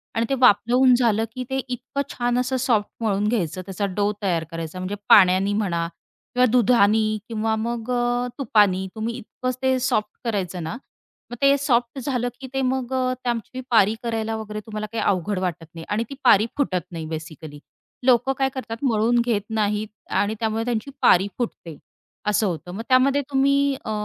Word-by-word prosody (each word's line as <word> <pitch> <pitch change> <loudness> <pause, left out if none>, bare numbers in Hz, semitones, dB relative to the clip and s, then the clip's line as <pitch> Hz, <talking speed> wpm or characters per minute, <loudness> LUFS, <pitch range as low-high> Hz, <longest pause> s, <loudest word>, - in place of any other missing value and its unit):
आणि 225 +1 +1
ते - - +1
वाफलवून 250 +2 +5
झालं 225 -3 +2
की 255 - -3
ते 265 - -1
इतकं 255 +2 -4
छान 245 0 -1
असं 255 +1 0
सॉफ्ट 230 -5 +1
मळून 205 -1 +1
घ्यायचं 185 -6 -1
त्याचा 195 +2 -3
डो 205 0 +1
तयार 175 -5 0
करायचा 165 +1 -6
म्हणजे 185 +2 -3
पाण्याने 190 +1 +6
म्हणा 170 -5 -1 0.5
किंवा 250 0 +5
दुधाने 220 -3 +4 0.2
किंवा 220 0 0
मग 230 +2 -3
अ, 245 0 0
तुपानी. 205 -7 +3
तुम्ही 225 +1 -3
इतकंच 255 +2 -5
ते 260 0 +2
सॉफ्ट 215 -4 0 0.2
करायचं 185 -6 -2
ना 160 +9 -4 0.5
मग - - -4
ते 275 0 +5
सॉफ्ट 250 -2 0
झालं 245 -2 -1
की 265 - -6
ते 270 - 0
मग 260 -1 -1 0.3
त्याची 240 +1 -3
पारी 220 -2 +4
करायला 225 -1 -2
वगैरे 215 -1 -5
तुम्हाला 215 -1 -5
काही 230 - -2
अवघड 195 0 0
वाटत 175 -3 -3
नाही 165 -1 -9
आणि 215 +2 0
ती 275 - -7
पारी 210 +2 +6
फुटत 185 - 0
नाही 165 -2 -5
बेसिकली. 155 -1 -8 0.5
लोकं 255 +1 +4
काय 270 -1 +1
करतात? 230 -3 -5
मळून 235 -1 +2
घेत 225 -4 +1
नाहीत 210 -1 0 0.3
आणि 205 +2 -1
त्यामुळे 225 0 -1
त्यांची 240 +2 -2
पारी 190 +3 +5
फुटते. 170 - -5 0.5
असं 210 0 +2
होतं. 175 -1 -4
मग 195 +5 -5
त्यामध्ये 265 +2 +4
तुम्ही 280 +1 +3
अ, - - -3
225 Hz, 175 wpm, -23 LUFS, 200-250 Hz, 0.5 s, पाण्याने